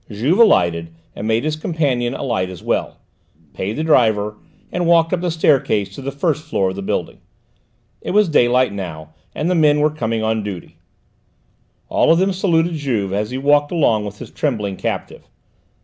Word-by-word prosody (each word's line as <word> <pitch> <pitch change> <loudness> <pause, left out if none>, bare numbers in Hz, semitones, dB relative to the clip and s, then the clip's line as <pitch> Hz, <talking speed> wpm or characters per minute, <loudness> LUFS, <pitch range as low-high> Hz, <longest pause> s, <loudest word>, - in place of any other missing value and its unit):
Juve 125 - 0
alighted 85 - +3 0.2
and 105 - -5
made 110 +2 +1
his 155 0 -1
companion 140 -7 -1
alight 110 -8 -2
as 90 -3 -10
well, - - -2 0.6
paid 95 +9 -3
the 155 - -3
driver, 110 -8 +2 0.4
and 175 -1 -1
walked 165 0 +4
up 180 - 0
the 180 - -1
staircase 135 - +1
to 135 - -8
the 135 +1 -4
first 150 +2 -1
floor 95 -12 -1
of - - -8
the 100 - -5
building. 95 - -3 0.8
It - - -6
was 210 +1 +3
daylight 125 -6 +3
now, 80 -5 -7 0.2
and 155 - -2
the 180 - +2
men 150 -3 +4
were 150 +1 +2
coming 115 -7 -2
on 110 0 0
duty; 100 -4 -8 1.1
all - - +3
of 165 - +5
them 190 +2 +1
saluted 175 -3 +1
Juve 120 -11 -2
as 105 +2 -1
he 130 - -4
walked 145 +2 +2
along 120 -11 +2
with 105 0 -7
his - - -10
trembling 105 -9 -2
captive. - - -5
130 Hz, 180 wpm, -19 LUFS, 105-160 Hz, 1.1 s, of